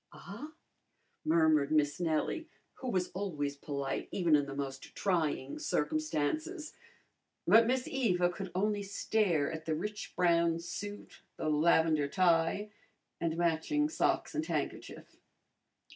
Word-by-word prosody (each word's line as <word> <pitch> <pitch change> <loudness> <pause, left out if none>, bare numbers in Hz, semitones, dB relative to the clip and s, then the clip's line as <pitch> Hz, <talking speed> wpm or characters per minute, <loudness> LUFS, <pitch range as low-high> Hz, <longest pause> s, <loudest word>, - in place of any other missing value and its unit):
"Ah?" 230 - -9 0.7
murmured 155 -3 +3
Miss 150 -1 +2
Nellie, 170 - -1 0.3
who 260 - -4
was 185 -5 0
always 150 -8 -3
polite 140 -1 -4
even 170 -5 +3
in 145 -1 +2
the 135 - -6
most 135 -1 -6
trying 160 -8 0
circumstances. 155 - -1 0.7
But 225 0 +6
Miss 255 +1 0
Eva 180 -9 +1
could 190 +1 -6
only 205 +2 +1
stare 195 -6 +1
at 160 0 -6
the 160 - 0
rich 210 +6 -5
brown 170 -2 +3
suit, 205 +4 -7 0.2
the 155 - -1
lavender 155 -1 +3
tie 175 +5 +2 0.5
and 165 -1 -1
matching 175 - +1
socks 315 - 0
and 310 - -1
handkerchief. - - -4
170 Hz, 125 wpm, -32 LUFS, 155-205 Hz, 0.7 s, But